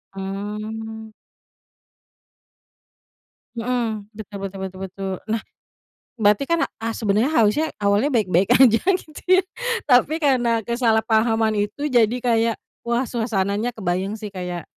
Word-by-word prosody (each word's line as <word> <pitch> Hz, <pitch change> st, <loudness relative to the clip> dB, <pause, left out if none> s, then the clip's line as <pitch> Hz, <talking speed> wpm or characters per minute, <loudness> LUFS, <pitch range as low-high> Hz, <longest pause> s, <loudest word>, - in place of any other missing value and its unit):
Mmm. 215 Hz, +3 st, -6 dB, 2.4 s
Mhm, 230 Hz, -3 st, -2 dB
betul 205 Hz, -1 st, -8 dB
betul 190 Hz, -1 st, -7 dB
betul. 195 Hz, 0 st, -5 dB, 0.2 s
Nah, 225 Hz, 0 st, 0 dB, 0.8 s
berarti 210 Hz, +4 st, +3 dB
kan, 335 Hz, 0 st, +2 dB, 0.2 s
a 225 Hz, -, -1 dB
sebenarnya 220 Hz, +4 st, +1 dB
harusnya 235 Hz, +3 st, +3 dB
awalnya 205 Hz, +7 st, +2 dB
baik-baik 190 Hz, -6 st, +2 dB
aja, 235 Hz, -4 st, +6 dB, 0.2 s
gitu 310 Hz, -3 st, -13 dB, 0.2 s
ya, -, -, +3 dB, 0.4 s
tapi 275 Hz, +4 st, +4 dB
karena 245 Hz, -7 st, +2 dB
kesalahpahaman 225 Hz, -1 st, +2 dB
itu 210 Hz, +8 st, -3 dB
jadi 240 Hz, -4 st, +3 dB
kayak, 230 Hz, -2 st, +2 dB, 0.3 s
wah, 235 Hz, +2 st, 0 dB
suasananya 220 Hz, -1 st, -1 dB
kebayang 190 Hz, +1 st, -2 dB
sih 210 Hz, -1 st, -7 dB
kayak, 180 Hz, -3 st, -5 dB
220 Hz, 110 wpm, -22 LUFS, 205-240 Hz, 2.4 s, aja